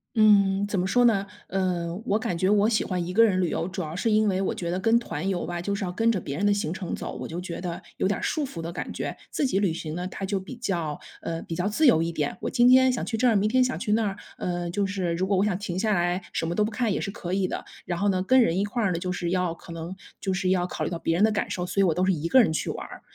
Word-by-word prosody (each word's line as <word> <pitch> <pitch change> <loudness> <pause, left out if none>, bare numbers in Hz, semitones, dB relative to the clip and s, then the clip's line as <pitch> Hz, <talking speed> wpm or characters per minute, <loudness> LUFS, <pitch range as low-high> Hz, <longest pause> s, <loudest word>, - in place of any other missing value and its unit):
嗯， 205 -2 +5
怎 205 - -2
么 180 - +1
说 245 +6 +3
呢？ 200 -4 +3 0.2
呃， 175 -3 -1
我 210 -2 +1
感 180 -5 -2
觉 185 +2 +2
我 205 0 +4
喜 220 -1 +2
欢 180 -2 -2
一 180 - -4
个 230 +4 +6
人 195 -5 +3
旅 180 - +2
游， 165 - -1
主 190 0 -4
要 155 -1 -5
是 220 +5 0
因 215 0 +4
为 190 -1 +1
我 195 - 0
觉 170 -1 -4
得 180 - -1
跟 225 +4 +3
团 175 -5 -4
游 185 -2 -1
吧， 175 +1 -4
就 200 +3 -2
是 200 0 -2
要 180 - -3
跟 225 +4 +2
着 200 - 0
别 140 - -5
人 195 +7 -1
的 205 - +4
行 185 -5 -1
程 185 -2 -5
走， - - -5
我 - - -5
就 170 - -5
觉 180 -1 -6
得 175 -2 -4
有 - - -1
点 205 - 0
儿 - - -8
束 305 -2 0
缚 255 -11 -7
的 165 +1 -5
感 - - -5
觉。 - - -4
自 285 - 0
己 195 - 0
旅 195 -5 +1
行 160 -1 -5
呢， 180 +1 -3
它 195 - -5
就 200 +1 -1
比 195 +7 -7
较 170 -10 -2 0.2
呃， 165 0 -4
比 165 - -5
较 175 - -1
自 310 +9 +2
由 165 -10 +5
一 165 - -2
点， 150 -3 -2
我 - - -2
今 240 -1 +4
天 260 +1 +7
想 250 - -2
去 225 - -2
这 225 +3 +1
儿， 230 -4 +5
明 200 +2 +2
天 255 +3 +4
想 255 0 -1
去 210 -4 0
那 220 0 +2
儿， 195 - -4 0.2
嗯， 175 -1 -2
就 200 +1 +1
是 190 -3 -1
如 180 +3 0
果 195 0 +1
我 195 - +3
想 200 -4 0
停 185 -3 -4
下 215 +1 +2
来 175 0 +1
什 - - -1
么 170 +1 -2
都 210 - +3
不 220 - -3
看 225 0 0
也 - - -1
是 200 - -3
可 180 -3 -6
以 190 0 +1
的， - - -4 0.2
然 175 - -2
后 200 +3 +1
呢， 185 -1 +1
跟 255 +7 +5
人 185 -6 +2
一 200 - +1
块 230 +3 -2
儿 195 - +2
呢， 170 - -1
就 180 +1 -2
是 175 -1 -2
要 180 -1 0
可 170 - -13
能 165 +2 -6 0.2
就 190 - -1
是 185 0 0
要 180 -1 +2
考 - - -4
虑 - - -1
到 170 - -4
别 165 - 0
人 185 - +3
的 220 - +5
感 210 - -1
受， 180 - -2
所 190 - -3
以 - - +6
我 170 - +3
都 180 - 0
是 190 - +3
一 165 -2 -1
个 260 +9 +6
人 210 - +2
去 160 - -2
玩 - - -4
儿。 - - -11
190 Hz, 355 characters per minute, -26 LUFS, 175-210 Hz, 0.2 s, 天